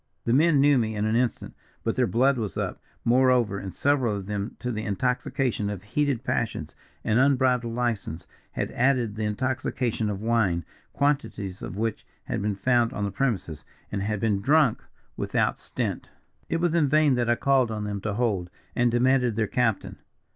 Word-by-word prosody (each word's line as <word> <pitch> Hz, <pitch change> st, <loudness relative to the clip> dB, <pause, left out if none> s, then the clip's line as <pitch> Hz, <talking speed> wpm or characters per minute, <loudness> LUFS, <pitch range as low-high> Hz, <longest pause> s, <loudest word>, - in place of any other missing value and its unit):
"The 115 Hz, -, +2 dB
men 150 Hz, +2 st, +4 dB
knew 140 Hz, -1 st, +5 dB
me 110 Hz, -1 st, -1 dB
in 105 Hz, 0 st, -1 dB
an 110 Hz, +1 st, +1 dB
instant, 120 Hz, 0 st, -1 dB, 0.3 s
but 115 Hz, -, 0 dB
their 125 Hz, -2 st, +2 dB
blood 130 Hz, +3 st, +2 dB
was 105 Hz, -6 st, -4 dB
up, -, -, -3 dB, 0.2 s
moreover; 125 Hz, -4 st, +3 dB
and 95 Hz, -, -6 dB
several 130 Hz, -5 st, +1 dB
of 100 Hz, -2 st, -5 dB
them 105 Hz, +2 st, -4 dB
to 125 Hz, -, -3 dB
the 110 Hz, -1 st, -3 dB
intoxication 120 Hz, +1 st, -1 dB
of 100 Hz, -3 st, -5 dB
heated 135 Hz, +3 st, 0 dB
passions 110 Hz, -12 st, -2 dB, 0.3 s
and 110 Hz, +3 st, +2 dB
unbridled 130 Hz, -3 st, +2 dB
license 115 Hz, -9 st, -2 dB, 0.3 s
had -, -, -2 dB
added 125 Hz, -4 st, +1 dB
the 110 Hz, 0 st, -2 dB
intoxication 120 Hz, 0 st, -1 dB
of 100 Hz, -2 st, -3 dB
wine; 105 Hz, -7 st, +1 dB, 0.3 s
quantities 135 Hz, -10 st, -1 dB
of 95 Hz, -, -6 dB
which 115 Hz, 0 st, -2 dB, 0.2 s
had -, -, -3 dB
been 105 Hz, 0 st, -1 dB
found 120 Hz, +4 st, +2 dB
on 105 Hz, -, -3 dB
the 100 Hz, -, -3 dB
premises, 95 Hz, -, -2 dB, 0.3 s
and 100 Hz, -, -2 dB
had 105 Hz, +1 st, -1 dB
been 105 Hz, -2 st, +1 dB
drunk 140 Hz, 0 st, +3 dB, 0.3 s
without -, -, 0 dB
stint. -, -, -4 dB, 0.4 s
"It -, -, +1 dB
was 170 Hz, -1 st, +1 dB
in 160 Hz, -5 st, +3 dB
vain 155 Hz, -1 st, +4 dB
that 120 Hz, -1 st, 0 dB
I 120 Hz, -, +4 dB
called 135 Hz, -2 st, +2 dB
on 110 Hz, -1 st, -3 dB
them 100 Hz, -1 st, -4 dB
to 105 Hz, -1 st, -2 dB
hold, 105 Hz, -7 st, 0 dB, 0.3 s
and 120 Hz, -1 st, +3 dB
demanded 125 Hz, -1 st, +2 dB
their 110 Hz, 0 st, +1 dB
captain. 115 Hz, -1 st, -1 dB
115 Hz, 185 wpm, -26 LUFS, 105-130 Hz, 0.4 s, knew